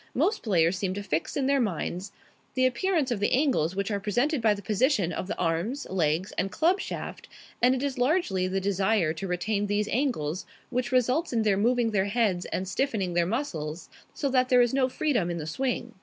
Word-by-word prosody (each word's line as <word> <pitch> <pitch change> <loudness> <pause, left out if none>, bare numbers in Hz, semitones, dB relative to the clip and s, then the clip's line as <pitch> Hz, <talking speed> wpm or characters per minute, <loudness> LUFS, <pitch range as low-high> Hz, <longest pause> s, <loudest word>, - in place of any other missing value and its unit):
Most 370 - +1
players 180 -4 +2
seem 190 -2 -1
to 205 - -4
fix 160 - -2
in 275 - +1
their 275 +1 +3
minds 185 -2 -3 0.4
the 255 0 +3
appearance 280 +2 +1
of 230 - 0
the 205 - +1
angles 255 - +2
which 200 +2 -2
are 200 - 0
presented 245 - 0
by 215 -2 +3
the 200 - -8
position 210 - +1
of - - -4
the 205 - -4
arms, 180 - -1
legs, 170 0 0
and 195 - -1
club 355 +5 +2
shaft, - - -6 0.3
and 250 +2 +5
it 260 - -3
is 275 -2 -2
largely 245 - +1
the 190 +1 -1
desire 195 -3 +1
to 190 +4 -5
retain 200 +4 -1
these 205 +1 0
angles 190 - -1 0.2
which 250 0 -1
results 255 +6 +2
in 225 -2 +2
their 210 -2 +3
moving 235 +3 +2
their 195 -2 +1
heads 200 -4 0
and 185 - -3
stiffening 200 -4 -1
their 170 0 +2
muscles 175 - -3 0.2
so 285 - -2
that 255 -1 +2
there 250 -2 +6
is 240 - 0
no 260 -1 +2
freedom 250 - 0
in 170 - -2
the 155 - -5
swing. 250 - -2
215 Hz, 210 wpm, -27 LUFS, 185-255 Hz, 0.4 s, there